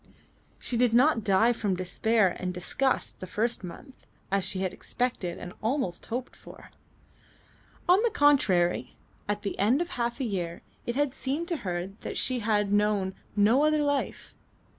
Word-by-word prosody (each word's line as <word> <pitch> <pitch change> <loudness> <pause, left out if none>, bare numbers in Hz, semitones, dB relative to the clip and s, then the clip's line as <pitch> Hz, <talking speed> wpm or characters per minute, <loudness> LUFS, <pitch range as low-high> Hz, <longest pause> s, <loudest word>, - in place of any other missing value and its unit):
She 240 - -2
did 240 -1 +3
not 250 -2 +4
die 215 +5 +4
from 205 -5 -1
despair 185 +2 +1
and 180 0 -2
disgust 215 +9 -1
the 185 - -7
first 220 +4 -1
month, 255 +9 -11 0.2
as 195 -1 +2
she 190 0 0
expected 190 0 -2
and 175 - -8
almost 220 -7 -1
hoped 245 +2 -4
for. - - -14 1.2
On 365 +3 +6
the 470 - +3
contrary, 260 - +3 0.3
at 205 0 -1
the 200 - -4
end 230 +8 +3
of 345 0 -2
half 235 +1 -2
a - - -1
year 180 -7 -3 0.2
it 240 - -1
had 285 -1 +1
seemed 285 +7 -2
to 340 - 0
her 175 -6 -3
that - - -5
she 255 -1 0
had 210 -2 +1
known 205 -2 +2 0.2
no 220 +7 +4
other 305 -1 +3
life. 285 -1 -2
220 Hz, 160 wpm, -28 LUFS, 190-265 Hz, 1.2 s, On